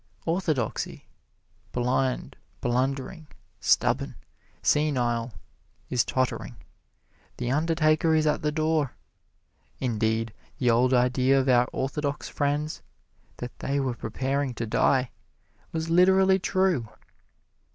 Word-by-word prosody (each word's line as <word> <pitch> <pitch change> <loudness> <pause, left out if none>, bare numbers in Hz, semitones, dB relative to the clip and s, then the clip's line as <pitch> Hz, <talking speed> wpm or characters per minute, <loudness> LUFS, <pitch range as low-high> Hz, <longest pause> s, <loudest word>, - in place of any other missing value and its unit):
Orthodoxy, 160 - -1 0.7
blind, 125 +1 -1 0.2
blundering, 135 +6 -1 0.3
stubborn, - - +2 0.5
senile, 120 -6 +1 0.6
is 125 -2 +3
tottering 130 +1 -2 0.8
the 120 0 -2
undertaker 155 +1 +2
is 155 -1 +2
at 150 - +1
the 150 - 0
door. 155 -2 0 0.8
Indeed, 115 -2 0 0.2
the 125 -2 +3
old 125 +2 +3
idea 130 +2 +3
of 135 - 0
our 125 -1 +5
orthodox 140 +2 -2
friends 145 +2 -1 0.6
that 125 0 -8
they 140 +1 -1
were 130 -2 0
preparing 130 +3 -2
to 115 - -3
die, 125 +3 +2 0.6
was 165 0 -3
literally 190 +2 +5
true. 185 - +1
135 Hz, 100 wpm, -26 LUFS, 125-155 Hz, 0.8 s, our